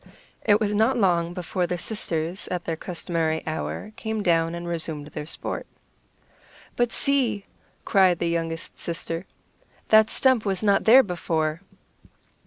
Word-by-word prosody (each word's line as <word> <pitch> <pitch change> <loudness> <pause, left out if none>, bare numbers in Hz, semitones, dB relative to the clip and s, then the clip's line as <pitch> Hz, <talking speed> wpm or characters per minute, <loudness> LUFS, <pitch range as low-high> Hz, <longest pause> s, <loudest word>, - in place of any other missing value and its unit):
It 205 -1 +4
was 210 -2 0
not 220 +5 +3
long 175 -5 +2
before 180 0 -2
the 180 - -2
sisters, 175 -3 -3
at 180 -1 -3
their 165 - -1
customary 165 -2 -2
hour, 160 +6 -4
came 220 -1 -3
down 165 -1 +2
and 170 0 -6
resumed 160 -3 -4
their 150 - -6
sport. - - -4 1.1
"But 240 -1 +1
see," 255 -8 +1 0.4
cried 185 -3 +4
the 170 - -1
youngest 165 -1 -3
sister, 165 +1 -4 0.6
"that 220 0 +6
stump 260 -4 +3
was 195 -1 -1
not 200 -2 +3
there 255 +4 +8
before." 165 -4 -2
180 Hz, 140 wpm, -25 LUFS, 165-215 Hz, 1.1 s, there